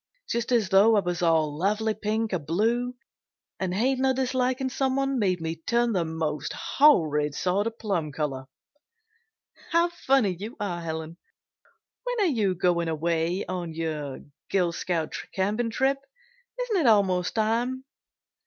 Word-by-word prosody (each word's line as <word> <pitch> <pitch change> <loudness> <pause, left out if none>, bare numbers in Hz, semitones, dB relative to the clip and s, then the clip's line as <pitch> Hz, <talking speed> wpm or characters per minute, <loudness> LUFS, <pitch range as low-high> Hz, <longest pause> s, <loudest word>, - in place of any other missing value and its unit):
Just 235 +1 -2
as 225 -6 +2
though 205 +4 +6
I - - +5
was 175 -3 -2
all 160 -3 +2
lovely 210 +6 0
pink 215 0 -2
or 180 - +1
blue, 225 - 0 0.6
and 190 -1 -1
hating 255 +7 +1
or 265 -1 +3
disliking 260 0 0
someone 270 0 0
made 185 -4 +1
me 165 0 -3
turn 235 +7 +1
the 180 -3 +1
most 160 -2 -3
horrid 150 - +3
sort 190 +6 0
of 230 0 -5
plum 175 -8 -2
color." 135 -3 -3 1.2
"How 335 +1 +3
funny 270 - +2
you 210 +7 -8
are, 180 -4 -3
Helen! 160 0 -5 0.9
When - - -2
are 355 -7 +3
you 200 -6 +1
going 170 -1 +1
away 165 +3 0
on 175 -3 -4
your 155 -4 -4 0.3
Girl 180 -3 +2
Scout 165 -2 -2 0.2
camping 210 +5 0
trip? 270 +4 +1 0.6
Isn't - - 0
it 315 -8 +2
almost 190 -5 +3
time?" 235 +4 0
200 Hz, 145 wpm, -26 LUFS, 165-245 Hz, 1.2 s, though